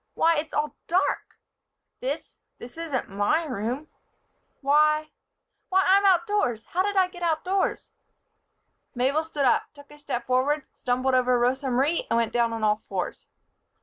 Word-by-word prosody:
Why! 330 Hz, 0 st, +3 dB
It's 305 Hz, +1 st, -3 dB
all 295 Hz, -1 st, -1 dB
dark. 365 Hz, +3 st, 0 dB, 0.6 s
This -, -, -5 dB, 0.2 s
this 240 Hz, -, -10 dB
isn't 325 Hz, -6 st, -3 dB
my 205 Hz, +12 st, +1 dB
room 250 Hz, +3 st, -3 dB, 0.7 s
why! 305 Hz, +2 st, +3 dB, 0.6 s
why! 380 Hz, 0 st, +3 dB
I'm 395 Hz, +1 st, +5 dB
outdoors! 345 Hz, -, +2 dB
How 360 Hz, -, +1 dB
did 405 Hz, +1 st, -1 dB
I 375 Hz, -1 st, +4 dB
get 360 Hz, -1 st, -13 dB
outdoors?" 350 Hz, +4 st, -1 dB, 1.0 s
Mabel 270 Hz, +6 st, +1 dB
stood 300 Hz, -3 st, -2 dB
up, 250 Hz, -, +3 dB
took 285 Hz, 0 st, -15 dB
a 295 Hz, -, -14 dB
step 255 Hz, -5 st, -4 dB
forward, 265 Hz, +3 st, +1 dB
stumbled 255 Hz, +1 st, 0 dB
over 250 Hz, -1 st, +3 dB
Rosa 260 Hz, +3 st, +1 dB
Marie 275 Hz, +7 st, +1 dB
and 230 Hz, -, +2 dB
went 230 Hz, -1 st, 0 dB
down 235 Hz, -1 st, +2 dB
on 225 Hz, -1 st, -4 dB
all 210 Hz, 0 st, +2 dB
fours. -, -, -4 dB
290 Hz, 150 wpm, -26 LUFS, 250-330 Hz, 1.0 s, I'm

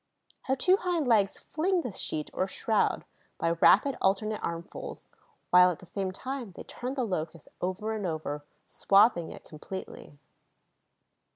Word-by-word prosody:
Her 265 Hz, -, +1 dB
two 370 Hz, +8 st, +4 dB
hind 350 Hz, -7 st, -1 dB
legs 210 Hz, -5 st, +3 dB
fling 355 Hz, +3 st, 0 dB
this 220 Hz, -6 st, -5 dB
sheet, 150 Hz, -1 st, -2 dB
or 185 Hz, -, 0 dB
shroud, 215 Hz, +3 st, 0 dB, 0.3 s
by 165 Hz, -, +1 dB
rapid 210 Hz, +10 st, +5 dB
alternate 210 Hz, +3 st, +1 dB
armfuls, 170 Hz, 0 st, -6 dB, 0.4 s
while, 180 Hz, 0 st, +8 dB
at 175 Hz, -, -3 dB
the -, -, -14 dB
same 190 Hz, +1 st, -3 dB
time, 250 Hz, 0 st, -5 dB
they -, -, -9 dB
turn 255 Hz, +2 st, -5 dB
the 260 Hz, -, 0 dB
Locust 165 Hz, -6 st, -4 dB
over 190 Hz, +5 st, -2 dB
and 210 Hz, -4 st, -2 dB
over, 150 Hz, -3 st, -4 dB, 0.2 s
swathing 195 Hz, -4 st, +3 dB
it -, -, -11 dB
completely. 155 Hz, -2 st, -9 dB
195 Hz, 150 wpm, -29 LUFS, 170-245 Hz, 0.4 s, while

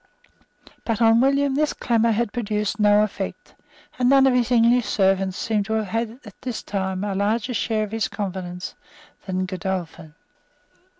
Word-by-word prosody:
But 225 Hz, -3 st, -1 dB
on 225 Hz, 0 st, +5 dB
William 275 Hz, +1 st, +2 dB
this 300 Hz, +2 st, +1 dB
clamour 230 Hz, -1 st, +1 dB
had 225 Hz, -1 st, -1 dB
produced 210 Hz, -3 st, -2 dB
no 210 Hz, 0 st, +5 dB
effect; 195 Hz, -2 st, -5 dB, 0.5 s
and 250 Hz, 0 st, +3 dB
none 270 Hz, 0 st, +6 dB
of 265 Hz, -, +4 dB
his 245 Hz, -1 st, +1 dB
English 240 Hz, 0 st, +4 dB
servants 195 Hz, -1 st, +1 dB
seems 215 Hz, -3 st, -1 dB
to 220 Hz, -, -2 dB
have 220 Hz, -2 st, -1 dB
had 230 Hz, +2 st, -3 dB
at 210 Hz, -, -14 dB
this 250 Hz, -3 st, -5 dB
time 190 Hz, -1 st, -3 dB
a 205 Hz, -1 st, -2 dB
larger 210 Hz, +5 st, 0 dB
share 220 Hz, -1 st, 0 dB
of 210 Hz, -, -6 dB
his 225 Hz, -1 st, -1 dB
confidence 185 Hz, -3 st, -5 dB, 0.5 s
than 185 Hz, 0 st, -1 dB
Godolphin. 180 Hz, -4 st, -5 dB
215 Hz, 165 wpm, -23 LUFS, 195-235 Hz, 0.5 s, none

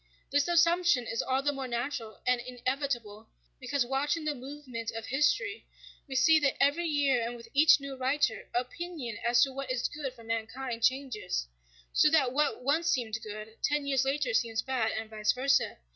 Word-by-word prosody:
This 285 Hz, +2 st, +2 dB
assumption 345 Hz, -5 st, +3 dB
is 230 Hz, -, -1 dB
all 265 Hz, +1 st, 0 dB
the 290 Hz, -, +2 dB
more 270 Hz, -1 st, -4 dB
natural 240 Hz, -2 st, -4 dB
and 250 Hz, -1 st, +2 dB
inevitable 245 Hz, -3 st, -3 dB, 0.3 s
because, 280 Hz, -4 st, 0 dB
watching 290 Hz, +5 st, -1 dB
the 305 Hz, -, 0 dB
movement 260 Hz, -4 st, -7 dB
of 225 Hz, 0 st, -5 dB
history, 300 Hz, -, 0 dB, 0.4 s
we 265 Hz, -, -6 dB
see 310 Hz, +5 st, +6 dB
that 280 Hz, -2 st, +1 dB
every 295 Hz, +5 st, +2 dB
year 285 Hz, -5 st, +2 dB
and 235 Hz, +1 st, -3 dB
with 230 Hz, -1 st, -12 dB
each 305 Hz, +2 st, +6 dB
new 280 Hz, -1 st, -6 dB
writer, 260 Hz, -2 st, 0 dB
opinion 250 Hz, -2 st, -4 dB
as 240 Hz, +1 st, +4 dB
to 270 Hz, -, -1 dB
what 275 Hz, 0 st, -5 dB
is 255 Hz, -1 st, 0 dB
good 290 Hz, -3 st, -5 dB
for 230 Hz, -, -14 dB
mankind 230 Hz, +2 st, -4 dB
changes; 240 Hz, -, 0 dB, 0.5 s
so 305 Hz, -, +5 dB
that 280 Hz, -6 st, +3 dB
what 295 Hz, -2 st, 0 dB
once 310 Hz, +6 st, +1 dB
seemed 225 Hz, -7 st, 0 dB
good, 215 Hz, 0 st, -8 dB
ten 295 Hz, -1 st, 0 dB
years 270 Hz, -2 st, +2 dB
later 270 Hz, -2 st, 0 dB
seems 225 Hz, -1 st, +1 dB
bad, 255 Hz, -4 st, 0 dB
and 220 Hz, 0 st, -4 dB
vice 215 Hz, -1 st, 0 dB
versa. 265 Hz, +2 st, +1 dB
265 Hz, 180 wpm, -30 LUFS, 235-290 Hz, 0.5 s, see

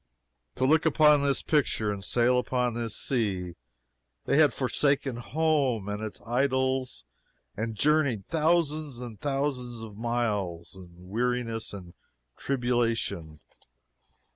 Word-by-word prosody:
To -, -, +1 dB
look 160 Hz, +4 st, +4 dB
upon 150 Hz, -1 st, +5 dB
this 140 Hz, -1 st, +1 dB
picture, 130 Hz, -8 st, +1 dB
and 100 Hz, -1 st, -7 dB
sail 125 Hz, +5 st, +2 dB
upon 125 Hz, -1 st, 0 dB
this 115 Hz, -2 st, -3 dB
sea, 95 Hz, -8 st, -1 dB, 0.7 s
they 140 Hz, -, +2 dB
had 150 Hz, -4 st, +6 dB
forsaken 135 Hz, 0 st, 0 dB
home 135 Hz, -5 st, 0 dB
and 105 Hz, +1 st, -3 dB
its 110 Hz, -1 st, -6 dB
idols 130 Hz, +1 st, 0 dB, 0.5 s
and 110 Hz, +1 st, -3 dB
journeyed 140 Hz, -5 st, +2 dB
thousands 155 Hz, -4 st, +1 dB
and 120 Hz, -4 st, -8 dB
thousands 135 Hz, -4 st, -2 dB
of 105 Hz, -2 st, -9 dB
miles, 105 Hz, -8 st, -2 dB
in 95 Hz, -2 st, -12 dB
weariness 115 Hz, +4 st, -2 dB
and 90 Hz, -4 st, -9 dB, 0.4 s
tribulation. 115 Hz, -, -1 dB
120 Hz, 115 wpm, -28 LUFS, 110-140 Hz, 0.7 s, had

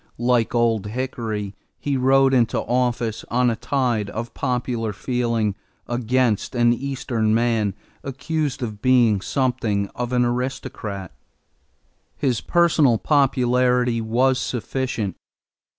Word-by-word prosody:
Like 120 Hz, -1 st, +1 dB
Old 115 Hz, -3 st, +2 dB
Hickory 110 Hz, -4 st, -4 dB, 0.3 s
he 145 Hz, -1 st, -1 dB
rode 135 Hz, +1 st, +4 dB
into 120 Hz, -3 st, +2 dB
office 120 Hz, -2 st, -1 dB
on 125 Hz, +1 st, +2 dB
a -, -, -1 dB
tide 120 Hz, -4 st, -1 dB
of 115 Hz, +1 st, -5 dB
popular 125 Hz, -4 st, -2 dB
feeling 115 Hz, -1 st, -1 dB, 0.3 s
against 120 Hz, -1 st, 0 dB
an 120 Hz, 0 st, +4 dB
Eastern 120 Hz, -4 st, -1 dB
man 115 Hz, -4 st, +1 dB, 0.3 s
accused 140 Hz, 0 st, -3 dB
of 105 Hz, -3 st, -5 dB
being 120 Hz, -6 st, +4 dB
something 110 Hz, -6 st, -1 dB
of 120 Hz, 0 st, -5 dB
an 125 Hz, -1 st, +2 dB
aristocrat. 120 Hz, -6 st, -4 dB, 1.1 s
His 125 Hz, -5 st, 0 dB
personal 160 Hz, -8 st, +3 dB
popularity 125 Hz, -3 st, +2 dB
was 125 Hz, +4 st, +2 dB
sufficient. 120 Hz, -6 st, -3 dB
120 Hz, 110 wpm, -22 LUFS, 110-130 Hz, 1.1 s, rode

